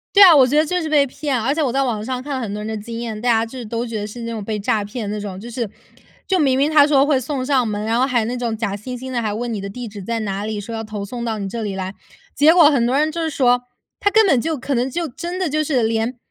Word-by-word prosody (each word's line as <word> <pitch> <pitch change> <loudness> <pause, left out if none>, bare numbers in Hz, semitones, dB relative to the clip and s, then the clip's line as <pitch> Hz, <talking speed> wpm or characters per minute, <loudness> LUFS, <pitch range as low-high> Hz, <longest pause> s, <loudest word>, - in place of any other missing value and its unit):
对 400 - +10
啊， 355 -4 +10
我 265 -3 +6
觉 290 +4 +1
得 310 - +4
就 360 +3 -1
是 315 - -3
被 295 -2 +4
骗。 280 0 -2
而 260 +5 +1
且 315 - -1
我 260 -4 0
在 275 0 +2
网 220 -5 -2
上 255 +2 -4
看 290 -1 -4
了 - - -3
很 210 -4 -4
多 210 - -4
人 - - -5
的 220 0 -3
经 230 +1 -6
验， 220 -3 -4
大 245 - -3
家 225 -1 +3
就 255 +3 -9
是 240 - -6
都 230 +2 -3
觉 225 -2 -4
得 205 - -4
是 235 +3 -9
那 230 0 -4
种 220 - -4
被 210 +1 -3
诈 215 +1 0
骗 210 +1 -5
的 - - -2
那 - - -4
种， 195 -3 -6
就 230 +5 -8
是 235 -3 -3 0.6
就 380 -1 +1
明 265 -4 +3
明 290 +3 +2
他 295 -1 +6
说 280 -2 +4
会 285 -3 +2
送 260 0 -3
上 260 -4 +2
门， 210 0 -3
然 230 +2 +1
后 260 - +4
还 240 -4 +1
那 245 +3 -3
种 235 -2 -2
假 210 -3 -2
惺 250 +5 -6
惺 260 +1 -7
地， 240 - -1
还 210 -2 -2
问 235 +2 -3
你 210 - -3
的 195 - -5
地 235 +3 -7
址 205 -1 -9
在 225 +3 -3
哪 200 0 -3
里， 215 -1 -3
说 230 +3 -7
要 225 - -3
投 215 -1 -5
送 235 +4 -5
到 225 -2 -2
你 195 -1 -4
这 230 +2 -4
里 200 -2 -3
来。 190 0 -4 0.4
结 300 +4 +5
果 330 -4 +7
很 240 -4 +2
多 255 +3 +1
人 310 +1 +2
就 335 +1 -3
是 320 - 0
说， 245 -4 +2 0.4
它 405 - +3
根 440 +2 +5
本 275 -10 +4
就 315 +4 -2
可 275 +2 -3
能 245 +2 0
就 340 +6 -2
真 340 +6 -5
的 365 -5 -1
就 305 +2 0
是 275 -6 +1
连 225 +2 0
245 Hz, 355 characters per minute, -20 LUFS, 220-280 Hz, 0.6 s, 对